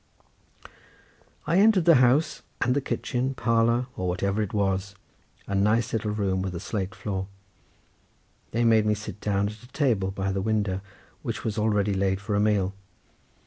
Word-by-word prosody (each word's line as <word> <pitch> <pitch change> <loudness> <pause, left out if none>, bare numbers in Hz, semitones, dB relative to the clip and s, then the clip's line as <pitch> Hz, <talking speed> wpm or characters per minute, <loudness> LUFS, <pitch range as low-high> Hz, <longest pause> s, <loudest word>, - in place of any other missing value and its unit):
I 170 - +2
entered 205 -4 +5
the 170 -4 +7
house, 130 +6 +3 0.2
and 125 +2 +1
the 145 - +1
kitchen, 130 0 -2
parlour, 115 +1 +2
or 90 - -3
whatever 100 +4 0
it 105 - -2
was, 95 -1 -1 0.5
a 100 - -5
nice 110 +4 +2
little 110 -1 -1
room 100 -3 0
with 95 -1 -3
a - - -3
slate 95 0 -4
floor. 95 -2 -4 1.2
They 120 +1 0
made 110 -2 +4
me 105 - +3
sit 105 0 -8
down 100 -1 +1
at 105 +1 -11
a 125 - -14
table 125 -9 0
by 95 0 -2
the 95 0 -1
window, 105 -3 0 0.4
which - - -4
was 110 0 -2
already 105 -2 +1
laid 95 0 0
for 105 +1 -4
a 100 - +2
meal. 105 -2 +2
105 Hz, 170 wpm, -26 LUFS, 95-115 Hz, 1.2 s, the